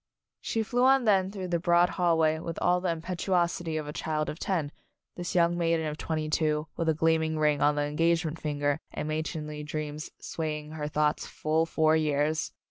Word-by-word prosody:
She 225 - -1
flew 245 +3 0
on 265 -1 +5
then 190 -3 +3
through 190 -2 -5
the 170 -1 +1
broad 175 0 +4
hallway 165 -3 +2
with 165 0 -5
all 180 0 +2
the 185 - 0
impetuosity 170 -1 -1
of 155 - -3
a - - -7
An - - -3
Announcement - - -5
Party 155 - 0
child 155 0 0
of 155 - -10
ten, 165 -7 -1 0.4
this 175 0 -5
young 170 -1 +4
maiden 165 -1 +1
of 150 0 -4
twenty 155 -1 -2
two 155 -1 +1
with 165 -1 0
a 160 - +2
gleaming 160 0 +1
ring 150 -2 +2
on 145 0 +4
the 145 - +1
engage 165 +3 +1
ment 155 +1 -4
finger 145 -1 0
and 150 - -4
matronly 155 -1 -3
dreams 150 +1 -5
sway 155 -2 -3
ing 150 0 -10
her 155 -1 -4
thoughts 150 0 0
full 160 +2 0
four 160 -1 +3
years! 155 0 0
160 Hz, 215 wpm, -28 LUFS, 150-170 Hz, 0.4 s, on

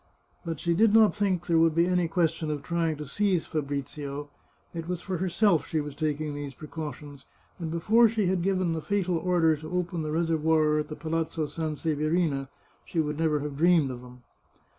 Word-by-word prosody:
But 165 -3 -4
she 170 - +1
did 215 +4 +4
not 220 -2 +6
think 195 -4 0
there 165 -2 +3
would 165 -1 +3
be 170 +1 +4
any 180 -1 +1
question 165 -1 0
of 145 -2 -3
trying 165 -2 -1
to 150 - -6
seize 185 +3 0
Fa 155 - -2
brizio; 140 0 -5 0.4
it 165 -1 -5
was 180 -1 -2
for 185 0 -4
herself 185 0 +2
she 160 - -1
was 145 -1 -4
taking 150 0 -2
these 145 -2 -6
precautions, 150 -2 -8 0.3
and 165 -2 -4
before 215 +9 +4
she 215 -2 0
had 185 -1 +1
given 185 -2 +1
the 160 - -3
fatal 185 -2 0
order 170 -3 +3
to 155 +1 -9
open 175 -1 -2
the 155 - -3
reser 165 +1 0
voir 155 -1 +3
at 150 - -3
the 150 - -6
Palazzo 160 0 -2
Sanseverina, 155 -1 -1 0.3
she 170 - -3
would 150 -1 -1
never 155 -3 +1
have 145 -1 -5
dreamed 165 -4 +4
of 125 -1 -7
them. 125 0 -14
160 Hz, 200 wpm, -27 LUFS, 150-175 Hz, 0.4 s, not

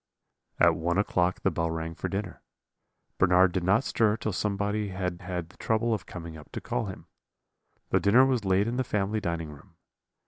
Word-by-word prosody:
"At - - +6
one 85 +3 -1
o'clock 90 -3 +1
the - - +2
bell 85 0 -1
rang 80 0 -4
for - - -4
dinner. 100 -2 -4 0.8
Bernard 90 0 +5
did 90 -1 -1
not 100 +7 +3
stir 110 -4 +2
till 110 -2 -3
somebody 105 +2 -1
had 90 -2 -3
had 90 -2 -4
the - - -20
trouble 115 +1 +1
of 105 - -4
coming 85 -2 -8
up 75 -2 -13
to - - -3
call 60 - -2
him. - - -8 0.9
The - - +4
dinner 120 +6 +5
was 130 -4 +1
laid 95 +2 +2
in 120 +1 -2
the 130 - +1
family 105 -2 -1
dining 85 -5 -3
room. 75 - -15
95 Hz, 195 wpm, -28 LUFS, 85-105 Hz, 0.9 s, At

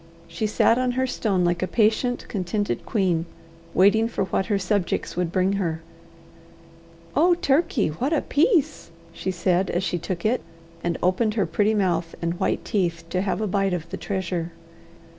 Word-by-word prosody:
She 215 - -2
sat 230 +3 +3
on 255 -1 +1
her 260 +1 +1
stone 195 -7 0
like 175 0 0
a 185 - 0
patient, 230 +4 +1
contented 205 +1 -2
queen, 180 -6 +1 0.5
waiting 205 +4 +5
for 230 - -2
what 190 0 -1
her 205 -3 +1
subjects 195 -1 -1
would 175 -1 -1
bring 185 +1 +2
her. 165 -2 -2 1.3
"Oh, 345 +4 +5
Turkey! 285 - +1
what 245 - -2
a 315 - +1
piece!" 315 - +1 0.2
she 190 - -4
said 185 0 +1
as 175 - -1
she 175 -2 -1
took 175 +1 -4
it, 235 +4 +2 0.4
and 170 -1 -1
opened 210 +4 +2
her 205 - +2
pretty 205 +6 +1
mouth 175 -4 0
and 170 +1 -2
white 190 - 0
teeth 170 -5 -1
to 185 - 0
have 200 +2 -1
a 215 - 0
bite 195 -1 +1
of 165 -1 -6
the - - -4
treasure. 180 -3 -3
195 Hz, 175 wpm, -24 LUFS, 175-220 Hz, 1.3 s, waiting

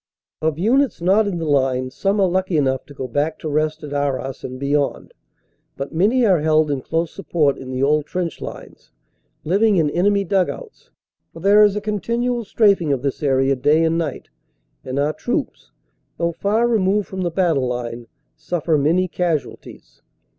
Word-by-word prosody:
Of 155 -1 0
units 250 +7 +2
not 195 +5 +3
in 190 -4 -2
the 165 - -3
line, 130 -3 +1
some 195 +8 -1
are 195 - +4
lucky 185 -1 0
enough 130 -2 0
to 145 - -12
go 130 - -5
back 145 +5 -1
to - - -7
rest 155 +1 -1
at 145 -1 -6
Arras 135 -2 -2
and 130 0 -6
beyond. 140 +1 -1 0.6
But 135 +3 -5
many 220 +9 +3
are 185 -6 +4
held 155 0 +2
in 135 -2 -2
close 165 +4 -2
sup 195 - -11
port 150 -5 +2
in 130 - -9
the 130 +1 -2
old 150 +1 +2
trench 180 -3 -4
lines, - - -10 0.5
living 200 +6 +2
in 155 -5 +2
enemy 200 +4 +2
dug 190 -1 +1
outs. - - -10 0.4
For - - -10
there 200 +3 +5
is 205 -1 +4
a 210 - -2
continual 235 +3 -1
straafing 200 -7 +2
of 135 -2 -1
this 140 -2 -2
area 135 -1 +2
day 145 +5 +3
and 165 +1 +1
night, 155 -5 -4 0.5
and 130 +1 -5
our 145 +2 +1
troops, - - -4 0.5
though 170 0 0
far 210 +7 +1
removed 205 -3 +1
from 190 -1 -5
the 175 - 0
battle 165 -7 +1
line, 120 -1 -5 0.3
suffer 155 0 -1
many 170 +6 +2
casualties. 170 -4 -4
160 Hz, 180 wpm, -20 LUFS, 140-195 Hz, 0.6 s, there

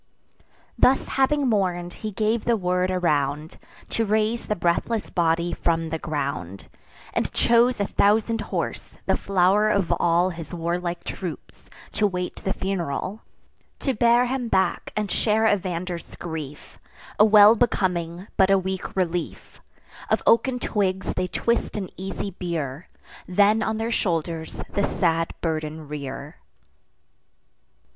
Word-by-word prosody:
Thus 265 +1 +4
having 275 +1 +2
mourn'd, 180 -5 0
he 215 - -5
gave 215 +3 0
the 235 -1 +2
word 180 -1 0
around, 150 -4 0 0.3
To 225 - 0
raise 220 +2 0
the 210 - 0
breathless 175 +6 -1
body 170 0 +1
from 165 -1 0
the 160 - -2
ground; 135 - -4 0.5
And - - -1
chose 235 0 +3
a 200 - +1
thousand 220 +3 +2
horse, - - -4
the - - +2
flow'r 195 +2 +3
of 200 -5 +1
all 175 +2 +3
His 165 0 -7
warlike 175 +1 -2
troops, 180 -4 -7 0.2
to 210 - +2
wait 180 -2 -4
the 195 - -3
funeral, 190 +1 -3 0.6
To 270 - 0
bear 235 +2 +4
him 250 -1 -2
back 190 -4 0
and 210 -2 -2
share 220 0 +2
Evander's 180 -4 -1
grief: 155 -4 -7 0.4
A - - +8
well 210 0 +8
becoming, 180 -6 0
but 190 0 +5
a 195 - +5
weak 190 0 -4
relief. 175 -2 -3 0.5
Of - - +1
oaken 250 +2 +4
twigs 190 -5 -1
they 180 - -1
twist 235 +4 -1
an 190 -3 -4
easy 195 +1 -5
bier, 165 -5 -4 0.4
Then 205 +4 +4
on 220 0 -1
their 225 +1 -2
shoulders 165 -5 -2
the 200 - +1
sad 165 -4 +1
burden 155 -1 -3
rear. 140 0 -6
185 Hz, 135 wpm, -24 LUFS, 170-215 Hz, 0.6 s, A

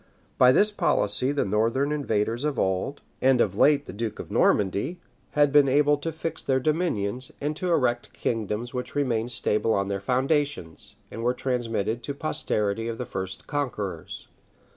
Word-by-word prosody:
By 125 0 +8
this 210 +10 +4
policy 125 - +1
the 145 - 0
northern 115 +8 +1
invaders 115 -4 -1
of 150 -4 -1
old, 95 +9 -1 0.2
and 130 -1 +4
of - - +2
late 145 -1 +4
the - - -8
duke 110 0 -4
of - - -8
Normandy, 105 - +1 0.3
had 145 -1 +4
been 145 -1 +5
able 145 +2 +4
to 165 +3 -4
fix 160 0 -5
their 130 -1 +2
dominions, 130 - -1
and 150 +2 -2
to 180 - -2
erect 125 -7 +1
kingdoms 115 +1 -3
which 125 -1 -5
remained 120 -4 0
stable 110 -1 +1
on 100 0 0
their 100 -1 -2
foundations, 130 - -1 0.2
and 115 - -6
were 125 +1 +1
transmitted 115 -3 -1
to 140 - -4
the - - -18
posterity 115 -8 -1
of 115 -1 -4
the 125 - -4
first 95 -3 -5
conquerors. 105 - -4
125 Hz, 170 wpm, -26 LUFS, 105-145 Hz, 0.3 s, By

